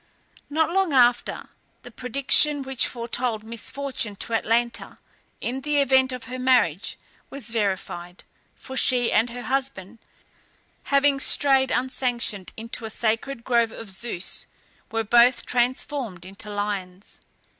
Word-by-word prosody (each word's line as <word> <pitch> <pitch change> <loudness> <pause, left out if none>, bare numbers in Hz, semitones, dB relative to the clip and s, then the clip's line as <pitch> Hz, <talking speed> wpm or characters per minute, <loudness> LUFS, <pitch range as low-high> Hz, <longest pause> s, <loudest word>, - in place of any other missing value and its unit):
Not 320 +3 +1
long 380 -4 +1
after, 245 -2 +3 0.4
the 245 - -11
prediction 275 +4 +3
which 265 -2 +1
foretold 235 -2 -2
misfortune 230 0 -4
to 230 - -5
Atalanta, 235 +1 0 0.4
in 260 +3 -3
the 295 +1 +1
event 265 -1 +4
of 250 -2 -6
her 255 +2 -6
marriage, 245 - +2 0.3
was 265 -5 -5
verified, 190 -5 -3 0.3
for 265 - -9
she 250 -3 +3
and 225 +3 +3
her 245 +1 -7
husband, 260 -7 -3 0.9
having 280 0 +3
strayed 270 -1 +3
unsanctioned 245 -7 -1
into 230 +1 -4
a - - -4
sacred 230 +3 -2
grove 235 -2 +2
of 225 -4 -8
Zeus, 190 -2 -2 0.4
were 225 0 0
both 240 +3 +4
transformed 245 -5 -1
into 195 +3 -8
lions. 205 -2 -4
240 Hz, 125 wpm, -24 LUFS, 220-265 Hz, 0.9 s, event